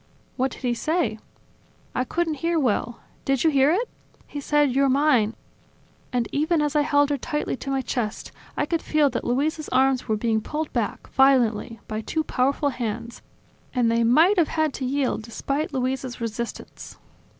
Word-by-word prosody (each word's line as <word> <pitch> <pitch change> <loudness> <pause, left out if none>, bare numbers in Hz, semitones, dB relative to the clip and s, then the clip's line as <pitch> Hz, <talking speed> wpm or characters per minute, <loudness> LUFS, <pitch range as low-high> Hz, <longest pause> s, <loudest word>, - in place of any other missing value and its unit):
"What 260 +1 +1
did 265 - -12
he 245 -1 +1
say?" 310 -2 -1 0.7
"I 255 - 0
couldn't 335 +3 -1
hear 335 0 +1
well... 240 -2 -1 0.2
Did 270 -2 +1
you 320 - +4
hear 275 0 +4
it? 415 +10 +1 0.4
He 290 - -6
said: 295 -1 +2
You're 275 +2 +3
mine!" 260 -6 +3 0.8
And 245 -2 0
even 315 +3 +1
as 300 0 0
I 300 - +5
held 290 0 +3
her 285 - 0
tightly 295 +4 -2
to 275 - -6
my 270 -1 0
chest, 225 -5 -3 0.3
I - - +1
could 330 +2 -1
feel 300 -3 +2
that 240 - -3
Luisa's 295 +5 -1
arms 260 0 +2
were 220 -2 +1
being 220 0 0
pulled 305 +6 -4
back, 230 -4 -2
violently, 235 -5 +3
by 215 0 -3
two 315 +8 -2
powerful 280 +2 +1
hands; 235 -2 -5 0.5
and 240 -2 +3
they 230 0 +2
might 320 - +5
have 325 - +4
had 315 -3 0
to 260 - -4
yield, 265 -2 0
despite 275 +7 -3
Luisa's 260 -1 -2
resistance." 230 0 -6
270 Hz, 175 wpm, -24 LUFS, 235-300 Hz, 0.8 s, I